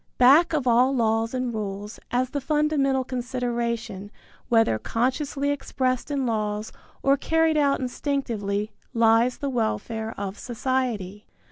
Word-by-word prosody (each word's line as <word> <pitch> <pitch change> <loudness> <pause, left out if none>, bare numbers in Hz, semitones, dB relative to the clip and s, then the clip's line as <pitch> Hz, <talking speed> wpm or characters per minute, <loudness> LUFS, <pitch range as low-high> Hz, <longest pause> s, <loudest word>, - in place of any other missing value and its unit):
Back 280 +8 +6
of 290 -4 0
all 250 +3 +4
laws 225 0 +1
and 250 -2 -2
rules, 205 0 -5
as 250 +1 0
the 285 - -2
fundamental 285 -2 +1
consideration, 240 -5 -3 0.4
whether 225 - +3
consciously 275 - -1
expressed 260 -2 -1
in 280 -2 -1
laws 215 -2 -2 0.3
or 275 +1 +4
carried 325 +2 +2
out 285 -2 +3
instinctively, 230 -6 -2 0.2
lies 230 +2 +4
the 285 - -3
welfare 225 -1 -2
of 200 0 -5
society. 235 -5 -2
245 Hz, 125 wpm, -25 LUFS, 220-275 Hz, 0.4 s, Back